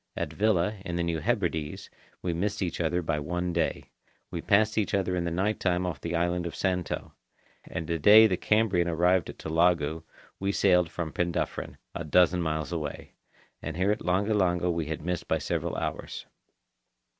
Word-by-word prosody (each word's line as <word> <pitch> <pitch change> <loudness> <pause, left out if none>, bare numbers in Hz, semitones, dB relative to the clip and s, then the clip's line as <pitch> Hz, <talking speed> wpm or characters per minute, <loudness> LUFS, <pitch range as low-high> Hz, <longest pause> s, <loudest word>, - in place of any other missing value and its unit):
At - - -3
Vila, 105 -1 +1
in 85 -3 -4
the 85 - 0
New 85 -1 -1
Hebrides, 85 -6 -2 0.3
we 90 - 0
missed 100 +4 -1
each 90 -1 -2
other 85 +2 0
by 75 -2 -1
one 90 +4 -2
day. 85 - -1 0.4
We 85 -2 -4
passed 105 +3 +3
each 105 -1 0
other 95 -2 0
in 85 -1 -1
the - - 0
night 95 +5 0
time 90 -1 +1
off 85 -6 -4
the 85 0 -3
island 85 +1 0
of 85 - -7
Santo. 90 -2 -2 0.5
And 80 - -5
the 85 +1 -2
day 105 +7 +8
the 100 -4 +2
Cambrian 100 -3 +2
arrived 90 +1 +2
at - - -8
Tulagi, 80 -1 +1 0.4
we 100 +1 -1
sailed 90 -4 +3
from 80 -3 -5
Penduffryn, 85 -1 -2 0.2
a 85 - -4
dozen 90 +3 +3
miles 80 -1 -2
away. 75 -4 -5 0.5
And 80 0 -5
here 95 +3 +2
at 105 - -1
Langa 95 +5 +1
Langa 90 -3 +2
we 85 -2 -2
had 80 -1 -4
missed 90 -1 -2
by - - +2
several - - -2
hours. - - -4
90 Hz, 185 wpm, -28 LUFS, 85-95 Hz, 0.5 s, day